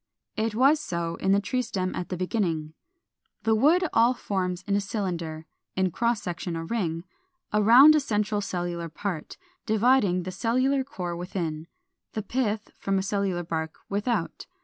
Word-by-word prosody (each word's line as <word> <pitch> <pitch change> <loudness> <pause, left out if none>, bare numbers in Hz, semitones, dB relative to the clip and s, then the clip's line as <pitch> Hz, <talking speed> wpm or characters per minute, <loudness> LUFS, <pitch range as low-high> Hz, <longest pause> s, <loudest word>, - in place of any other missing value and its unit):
It 220 0 -1
was 275 +6 +5
so 170 - -3
in 190 - +1
the 200 - +5
tree 250 +5 -1
stem 190 -6 -2
at 180 - -4
the 180 - -3
beginning. 170 -5 -1 0.7
The 220 +1 +3
wood 315 +11 +4
all 235 +3 +4
forms 185 -5 -2
in 200 +1 0
a 205 - +2
cylinder, 170 -6 -3 0.3
in 185 -1 +1
cross 235 +2 0
section 175 0 -4
a 165 0 -4
ring 165 -6 -2 0.5
around 235 +8 +8
a 305 - +4
central 210 -5 0
cellular 175 -3 -3
part, 170 0 -5 0.3
dividing 215 -5 +3
the 185 - -5
cellular 255 +7 +1
core 180 -11 -5
within, 170 -3 -4 0.5
the 215 - -3
pith, 215 -2 -2
from 195 0 0
a 190 - 0
cellular 195 -3 -1
bark 160 -1 -3
without. 205 -2 -2
200 Hz, 160 wpm, -26 LUFS, 175-230 Hz, 0.7 s, around